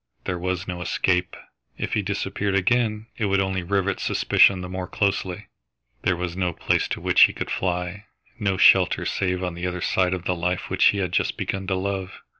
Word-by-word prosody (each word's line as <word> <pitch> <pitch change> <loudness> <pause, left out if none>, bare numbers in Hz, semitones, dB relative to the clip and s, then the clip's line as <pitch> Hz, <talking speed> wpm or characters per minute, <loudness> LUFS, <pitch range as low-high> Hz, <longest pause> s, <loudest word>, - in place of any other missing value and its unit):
There 90 -1 -2
was 90 0 -3
no 90 -1 -5
escape! 90 0 0 0.4
If - - -4
he 105 - +2
disappeared 100 0 -2
again, 110 +2 +1
it 110 - +1
would 100 -1 +2
only 95 -1 0
rivet 95 +1 -1
suspicion 95 -2 +3
the 90 - -5
more 90 0 -5
closely. 95 -1 -1 0.6
There 95 - +1
was 90 -1 -4
no 90 -2 -1
place - - 0
to - - -4
which - - +2
he - - -3
could - - -5
fly, 90 +3 -2 0.3
no 100 -4 0
shelter - - +5
save 90 -1 -1
on 90 -1 -2
the 85 +1 -4
other 90 0 -3
side 95 +1 +1
of 90 -1 -8
the 90 - +1
life 90 +1 -2
which - - +3
he 105 - +5
had 95 -3 -1
just - - 0
begun 95 -1 -3
to 95 - 0
love. 95 0 -3
95 Hz, 205 wpm, -24 LUFS, 90-100 Hz, 0.6 s, shelter